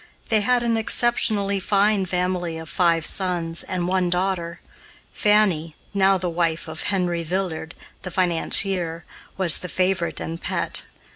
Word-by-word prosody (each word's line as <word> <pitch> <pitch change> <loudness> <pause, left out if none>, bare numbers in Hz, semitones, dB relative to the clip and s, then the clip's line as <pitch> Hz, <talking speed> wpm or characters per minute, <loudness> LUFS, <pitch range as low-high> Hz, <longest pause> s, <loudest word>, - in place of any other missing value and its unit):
They 220 -2 +3
had 245 +3 +2
an 230 -1 +1
exceptionally 220 -3 +2
fine 200 0 +2
family 180 -2 -2
of 160 0 -8
five 170 -3 +2
sons 175 -3 +1
and 180 -1 -2
one 185 -1 +1
daughter. 180 -1 -1 0.5
Fanny, 190 -7 +2 0.2
now 195 -1 +3
the 180 0 -3
wife 170 -1 -1
of 160 0 -6
Henry 180 -4 0
Villard, 170 -1 -3 0.3
the 185 - -6
financier, 175 -1 0 0.3
was 180 -4 +2
the 180 - -6
favorite 185 -1 0
and 165 +1 -5
pet. - - -1
180 Hz, 140 wpm, -23 LUFS, 170-195 Hz, 0.5 s, They